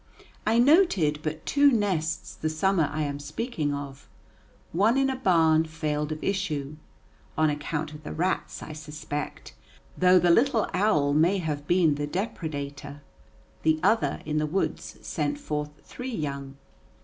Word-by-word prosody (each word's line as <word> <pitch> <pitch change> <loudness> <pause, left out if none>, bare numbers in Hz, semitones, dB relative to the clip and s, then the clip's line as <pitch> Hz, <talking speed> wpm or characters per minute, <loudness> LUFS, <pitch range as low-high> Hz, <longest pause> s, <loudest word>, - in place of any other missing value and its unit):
I 225 +2 +3
noted 240 - +4
but 155 0 -4
two 285 0 +5
nests 185 -9 -1
the 155 - -3
summer 160 0 +1
I 155 +1 -1
am 145 -1 -3
speaking 150 - -3
of: 140 -1 -7 0.6
one 210 +9 +3
in 270 0 +2
a - - -2
barn 165 -9 +3
failed 150 -1 -2
of 155 - -5
issue, 155 -7 -2 0.6
on 155 -1 +3
account 150 +1 -3
of 150 - -10
the - - -7
rats, 180 +4 -2
I 155 - -7
suspect, 150 - -6 0.4
though 185 0 +5
the 175 -1 +4
little 235 +3 +3
owl 155 -8 +2
may 170 +6 +3
have 150 -5 -3
been 175 -4 +4
the 145 - -1
depredator; 145 -6 -5 0.6
the 155 0 +2
other, 185 -8 +2
in 155 0 0
the 155 - 0
woods, 190 +6 -2
sent 290 - -2
forth 150 - -3
three 255 +1 -7
young. 140 -4 -4
155 Hz, 150 wpm, -27 LUFS, 150-195 Hz, 0.6 s, two